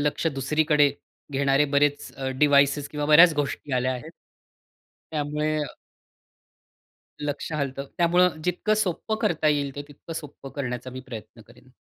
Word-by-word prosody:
लक्ष 150 Hz, +3 st, 0 dB
दुसरीकडे 150 Hz, +1 st, +2 dB, 0.4 s
घेणारे 140 Hz, +1 st, +3 dB
बरेच 145 Hz, 0 st, +1 dB, 0.3 s
डिव्हाइसेस 140 Hz, 0 st, +4 dB
किंवा 150 Hz, -1 st, -3 dB
बऱ्याच 165 Hz, +3 st, +8 dB
गोष्टी 145 Hz, -1 st, -3 dB
आल्या 130 Hz, 0 st, +1 dB
आहेत. 140 Hz, +6 st, -7 dB, 1.0 s
त्यामुळे 150 Hz, +1 st, -1 dB
अ -, -, -6 dB, 1.5 s
लक्ष 150 Hz, +2 st, -4 dB
हलतं. 140 Hz, -2 st, -3 dB
त्यामुळं 175 Hz, -1 st, +3 dB
जितकं 180 Hz, +4 st, +1 dB
सोप्पं 215 Hz, +2 st, -1 dB
करता 165 Hz, -7 st, +2 dB
येईल 140 Hz, -2 st, 0 dB
ते 145 Hz, -, -4 dB
तितकं 145 Hz, +3 st, -10 dB
सोपं 145 Hz, -3 st, -8 dB
करण्याचा 125 Hz, -2 st, -4 dB
मी 130 Hz, +1 st, -7 dB
प्रयत्न 115 Hz, -1 st, -9 dB
करेन. 125 Hz, +2 st, -19 dB
145 Hz, 130 wpm, -25 LUFS, 135-155 Hz, 1.5 s, बऱ्याच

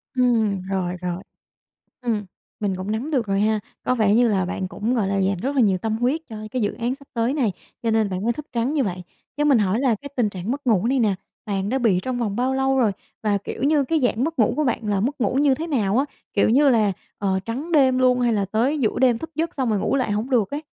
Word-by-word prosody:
Ừm, 225 Hz, -6 st, +2 dB
rồi, 185 Hz, -1 st, -2 dB
rồi. 180 Hz, 0 st, -3 dB, 0.8 s
Ừm, 225 Hz, -5 st, -1 dB, 0.4 s
mình 200 Hz, -3 st, -1 dB
cũng 185 Hz, +3 st, -5 dB
nắm 240 Hz, +8 st, -3 dB
được 255 Hz, -7 st, 0 dB
rồi 195 Hz, 0 st, 0 dB
ha. 215 Hz, 0 st, +2 dB, 0.2 s
Có 255 Hz, -, +2 dB
vẻ 215 Hz, -4 st, +3 dB
như 240 Hz, 0 st, +4 dB
là 195 Hz, -3 st, +1 dB
bạn 185 Hz, +1 st, -3 dB
cũng, 220 Hz, +5 st, -2 dB
gọi 210 Hz, -6 st, +1 dB
là, 195 Hz, -, 0 dB
dành 190 Hz, 0 st, +1 dB
rất 275 Hz, +2 st, -2 dB
là -, -, +4 dB
nhiều 190 Hz, -3 st, +3 dB
tâm 220 Hz, +2 st, -2 dB
huyết 255 Hz, +7 st, +1 dB
cho 220 Hz, -, -7 dB
cái 250 Hz, -3 st, -1 dB
dự 205 Hz, -, 0 dB
án 240 Hz, +1 st, -2 dB
sắp 280 Hz, 0 st, -18 dB
tới 235 Hz, +4 st, +1 dB
này 240 Hz, -10 st, +1 dB, 0.3 s
cho 230 Hz, -, +1 dB
nên 220 Hz, -2 st, +2 dB
bạn 185 Hz, 0 st, -3 dB
mới 235 Hz, -, +2 dB
thức 300 Hz, +5 st, -8 dB
trắng 245 Hz, +5 st, 0 dB
như 285 Hz, -, +2 dB
vậy. 180 Hz, -2 st, -4 dB, 0.3 s
Cho 295 Hz, -, +1 dB
mình 280 Hz, -5 st, +5 dB
hỏi 205 Hz, +3 st, +1 dB
là 255 Hz, -4 st, +3 dB
cái 280 Hz, +7 st, -9 dB
tình 235 Hz, -5 st, +2 dB
trạng 185 Hz, +3 st, -5 dB
mất 280 Hz, +1 st, -4 dB
ngủ 220 Hz, -3 st, +3 dB
này 265 Hz, +2 st, +2 dB
nè, 215 Hz, -5 st, +2 dB, 0.3 s
bạn 195 Hz, -1 st, -1 dB
đã 265 Hz, +3 st, 0 dB
bị 210 Hz, -7 st, +2 dB
trong 255 Hz, -1 st, -2 dB
vòng 210 Hz, -3 st, -2 dB
bao 255 Hz, +2 st, +1 dB
lâu 265 Hz, 0 st, +1 dB
rồi 225 Hz, -5 st, +3 dB, 0.3 s
và, 210 Hz, -2 st, +1 dB
kiểu 200 Hz, -, -7 dB
như, 290 Hz, -1 st, +3 dB
cái 320 Hz, +4 st, +1 dB
dạng 245 Hz, -1 st, +1 dB
mất 320 Hz, -2 st, -3 dB
ngủ 220 Hz, -, +4 dB
của 305 Hz, -, +1 dB
bạn 235 Hz, -3 st, -1 dB
là 200 Hz, -2 st, +1 dB
mất 265 Hz, +7 st, -2 dB
ngủ 230 Hz, +2 st, +1 dB
như 280 Hz, 0 st, +4 dB
thế 315 Hz, +5 st, -4 dB
nào 230 Hz, -8 st, +1 dB
á, 270 Hz, -, +3 dB, 0.3 s
kiểu 205 Hz, -, +3 dB
như 280 Hz, +4 st, +5 dB
là, 215 Hz, -5 st, +3 dB, 0.3 s
ờ, 190 Hz, -1 st, 0 dB
trắng 270 Hz, +10 st, -4 dB
đêm 265 Hz, -4 st, +4 dB
luôn 250 Hz, -1 st, +3 dB
hay 240 Hz, -1 st, +2 dB
là 205 Hz, -2 st, +1 dB
tới 230 Hz, +10 st, 0 dB
giữa 220 Hz, -, +1 dB
đêm 245 Hz, -3 st, +3 dB
thức 320 Hz, +4 st, -7 dB
giấc 325 Hz, +2 st, -2 dB
xong 260 Hz, -4 st, 0 dB
rồi 210 Hz, -, +1 dB
ngủ 270 Hz, -, 0 dB
lại 255 Hz, -5 st, 0 dB
hổng 220 Hz, +6 st, -2 dB
được 225 Hz, -6 st, +2 dB
ấy? 290 Hz, +2 st, -4 dB
230 Hz, 275 wpm, -23 LUFS, 205-265 Hz, 0.8 s, mình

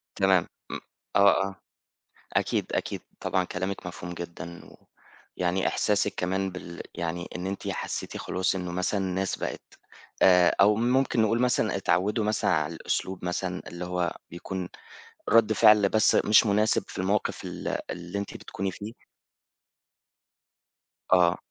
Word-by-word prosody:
تمام 95 Hz, -3 st, +3 dB, 0.2 s
م -, -, -3 dB, 0.4 s
آه، 100 Hz, -1 st, +5 dB
آه، 95 Hz, -, -8 dB, 0.8 s
أكيد -, -, +1 dB
أكيد -, -, -2 dB, 0.2 s
طبعًا 95 Hz, -, 0 dB
كلامِك 95 Hz, +2 st, -4 dB
مفهوم 90 Hz, 0 st, -6 dB
جدًا 85 Hz, 0 st, -8 dB
و -, -, -15 dB, 0.6 s
يعني 90 Hz, +1 st, +1 dB
إحساسِك 105 Hz, -1 st, +1 dB
كمان 95 Hz, +1 st, -1 dB
بال 90 Hz, -1 st, -8 dB
يعني 85 Hz, +1 st, -3 dB
إن 90 Hz, +1 st, -3 dB
أنتِ 95 Hz, 0 st, -4 dB
حسّيتِ -, -, -4 dB
خلاص 95 Hz, +1 st, -1 dB
إن 90 Hz, -1 st, -3 dB
مثلًا 90 Hz, +3 st, -1 dB
الناس 95 Hz, 0 st, -1 dB
بقِت -, -, -6 dB, 0.4 s
آآ 90 Hz, -2 st, +6 dB
أو 105 Hz, +2 st, +6 dB
ممكن 125 Hz, +2 st, +2 dB
نقول 115 Hz, +2 st, +2 dB
مثلًا 125 Hz, -3 st, +2 dB
اتعوّدوا 100 Hz, +3 st, +1 dB
مثلًا 105 Hz, 0 st, +1 dB
على 75 Hz, +1 st, 0 dB
الأسلوب 95 Hz, +2 st, -3 dB
مثلًا 90 Hz, +1 st, -2 dB
اللي 85 Hz, +1 st, -6 dB
هو 90 Hz, -1 st, -2 dB
بيكون 90 Hz, +1 st, -5 dB, 0.6 s
رد 115 Hz, -1 st, +5 dB
فعل 105 Hz, -2 st, +6 dB
بس 110 Hz, +1 st, +4 dB
مش 105 Hz, +2 st, +6 dB
مناسب 105 Hz, +1 st, +2 dB
في -, -, -10 dB
الموقف 95 Hz, +3 st, 0 dB
ال -, -, -6 dB, 0.2 s
اللي 85 Hz, +3 st, -5 dB
أنتِ 100 Hz, -, -5 dB
بتكوني 95 Hz, 0 st, -4 dB
فيه 105 Hz, +4 st, -8 dB, 2.2 s
آه 90 Hz, -1 st, +5 dB
95 Hz, 140 wpm, -27 LUFS, 90-105 Hz, 2.2 s, آآ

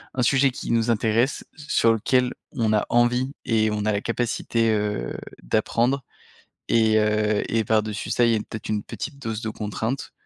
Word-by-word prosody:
un 125 Hz, -, +1 dB
sujet 135 Hz, +2 st, +4 dB
qui 125 Hz, -, -5 dB
nous 115 Hz, 0 st, +2 dB
intéresse, 115 Hz, +3 st, +1 dB
sur 145 Hz, -6 st, +2 dB
lequel 125 Hz, +3 st, +1 dB, 0.2 s
on 110 Hz, -3 st, +1 dB
a 105 Hz, -, +2 dB
envie 125 Hz, +3 st, +2 dB
et 110 Hz, -2 st, +2 dB
on 105 Hz, -1 st, -2 dB
a 110 Hz, -, +2 dB
la 100 Hz, -1 st, -1 dB
capacité, 115 Hz, -1 st, 0 dB
heu, 105 Hz, -, -1 dB, 0.3 s
d'apprendre 120 Hz, -, +1 dB, 0.7 s
et 110 Hz, -1 st, +4 dB
heu, 105 Hz, 0 st, +1 dB
et 115 Hz, 0 st, +1 dB
par-dessus 105 Hz, -1 st, -1 dB
ça 120 Hz, -, +3 dB
il 115 Hz, -, +3 dB
y -, -, +3 dB
a, -, -, +1 dB
peut-être, 110 Hz, +1 st, -7 dB
une 105 Hz, -1 st, -1 dB
petite 145 Hz, +5 st, -7 dB
dose 115 Hz, -5 st, -4 dB
de 110 Hz, -, -2 dB
contraintes 110 Hz, +4 st, -4 dB
115 Hz, 180 wpm, -24 LUFS, 105-120 Hz, 0.7 s, sujet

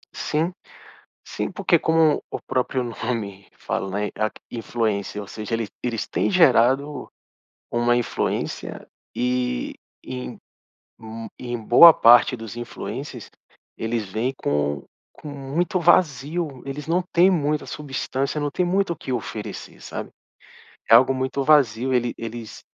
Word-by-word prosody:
Sim. 160 Hz, +4 st, -1 dB, 0.7 s
Sim, -, -, -3 dB
porque 170 Hz, -, +2 dB
como 160 Hz, -1 st, +3 dB
o -, -, -4 dB
próprio 130 Hz, 0 st, 0 dB
nome, 110 Hz, -4 st, -4 dB
fala, 95 Hz, -, -3 dB
né, 105 Hz, -, -2 dB
a 110 Hz, 0 st, 0 dB
q -, -, -17 dB
influência, 110 Hz, -3 st, -2 dB
ou -, -, -10 dB
seja 105 Hz, +3 st, -5 dB
ele 115 Hz, -2 st, -1 dB, 0.2 s
eles 115 Hz, -3 st, -2 dB
têm -, -, 0 dB
gerado 140 Hz, -4 st, +3 dB, 0.6 s
uma 120 Hz, 0 st, +2 dB
influência, 120 Hz, -, -2 dB, 0.3 s
e 125 Hz, -, -1 dB, 0.3 s
em 65 Hz, 0 st, -6 dB, 0.6 s
hum 110 Hz, 0 st, -8 dB
em 120 Hz, -1 st, -4 dB
boa 160 Hz, +9 st, +9 dB
parte 120 Hz, +2 st, +6 dB
dos 115 Hz, 0 st, -8 dB
influencers, 120 Hz, -1 st, -6 dB, 0.5 s
eles 115 Hz, 0 st, -2 dB
vêm 120 Hz, +7 st, -1 dB
com 75 Hz, -, -1 dB, 0.3 s
com -, -, -12 dB
muito 150 Hz, +7 st, -2 dB
vazio, 155 Hz, -3 st, +1 dB
eles 140 Hz, +2 st, -6 dB
não 175 Hz, +2 st, +1 dB
têm 180 Hz, +3 st, +6 dB
muita 150 Hz, -4 st, 0 dB
substância, 140 Hz, 0 st, -3 dB
não 145 Hz, -, 0 dB
têm 180 Hz, -, 0 dB
muito 185 Hz, 0 st, +1 dB
o -, -, -12 dB
que 135 Hz, -, -7 dB
oferecer, 110 Hz, -3 st, -5 dB
sabe? -, -, -6 dB, 0.8 s
É 115 Hz, -, +9 dB
algo 130 Hz, +3 st, +6 dB
muito 130 Hz, +1 st, -2 dB
vazio, 130 Hz, -4 st, +3 dB
ele 120 Hz, -1 st, +1 dB
eles 115 Hz, -1 st, -7 dB
125 Hz, 135 wpm, -23 LUFS, 115-150 Hz, 0.8 s, boa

